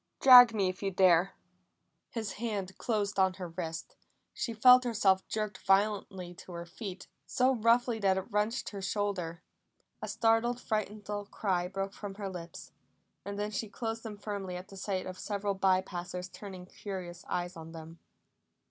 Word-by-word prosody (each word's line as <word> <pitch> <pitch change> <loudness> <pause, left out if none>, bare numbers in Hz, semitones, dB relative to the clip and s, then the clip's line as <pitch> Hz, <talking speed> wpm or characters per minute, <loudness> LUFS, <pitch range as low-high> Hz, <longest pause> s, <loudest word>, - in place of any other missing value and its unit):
Drag 250 -3 +10
me 205 -4 +1
if 185 +1 -4
you 200 - 0
dare." 185 -1 +4 0.7
His 220 -4 -4
hand 200 -5 -3
closed 205 -4 -1
on 190 -1 +3
her 185 -2 -6
wrist; 165 -1 -6 0.4
she 235 - -3
felt 250 +3 +7
herself 205 -5 +2
jerked 215 -1 -3
violently 195 -2 +1
to 185 0 -12
her 170 0 -6
feet, 185 +1 -8 0.2
so 255 +1 +3
roughly 235 0 +3
that 195 -2 +3
it 190 - -2
wrenched 210 +4 0
her 200 -2 -7
shoulder. 190 -4 -2 0.6
A - - -4
startled, 230 +2 +2
frightened 215 -3 -3
little 205 -1 -4
cry 185 -4 -1
broke 195 +1 -4
from 205 -2 -7
her 200 -1 -4
lips, 170 -2 -9 0.5
and 200 0 -5
then 210 +1 -2
she 215 +1 -3
closed 225 0 -4
them 220 -3 -7
firmly 200 -3 -5
at 180 +1 -8
the 195 - -11
sight 190 -1 -3
of 185 0 -7
several 205 -1 -2
by 190 -1 +3
passers 180 0 -6
turning 190 -3 -9
curious 185 -2 -7
eyes 175 +1 -2
on 165 0 -9
them. 165 0 -10
195 Hz, 170 wpm, -31 LUFS, 185-215 Hz, 0.7 s, Drag